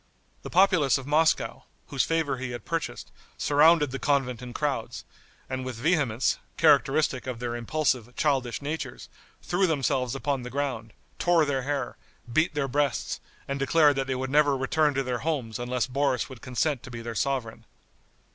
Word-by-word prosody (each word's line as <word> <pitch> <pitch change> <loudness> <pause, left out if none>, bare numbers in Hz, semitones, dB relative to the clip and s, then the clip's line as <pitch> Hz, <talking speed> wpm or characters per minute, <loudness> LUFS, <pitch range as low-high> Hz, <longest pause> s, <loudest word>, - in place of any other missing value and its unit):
The - - -7
populace 180 -7 +4
of 135 - -7
Moscow, 155 +3 +1 0.2
whose 135 - +1
favor 160 -5 0
he 130 0 -4
had 120 0 -7
purchased, 165 -1 -4 0.3
surrounded 150 0 +4
the 135 - -4
convent 135 -4 0
in 125 -1 -7
crowds, 135 -3 -3 0.4
and 130 0 -4
with 130 -2 -5
vehemence, 130 -3 +1 0.2
characteristic 145 -3 +3
of 125 -2 -3
their 120 0 -3
impulsive, 125 -1 -1
childish 135 -4 0
natures, 155 +3 -5 0.3
threw 185 +2 +1
themselves 135 -4 0
upon 135 -1 -1
the 125 - -6
ground, 125 -5 -3 0.3
tore 175 -3 +4
their 140 -2 0
hair, 140 +1 -3 0.4
beat 155 +1 +2
their 145 -2 0
breasts, 140 -1 -1 0.3
and 140 0 -3
declared 145 +1 +4
that 135 -1 -1
they 130 - -1
would 130 +1 -3
never 145 -1 +4
return 150 +2 +1
to 135 - +1
their 125 -2 -2
homes 130 -7 -2
unless 125 0 -1
Boris 135 0 0
would 130 -3 -11
consent 130 +1 -1
to 125 - -10
be 120 -1 -7
their 115 0 -5
sovereign. 115 -2 -2
135 Hz, 170 wpm, -27 LUFS, 125-150 Hz, 0.4 s, populace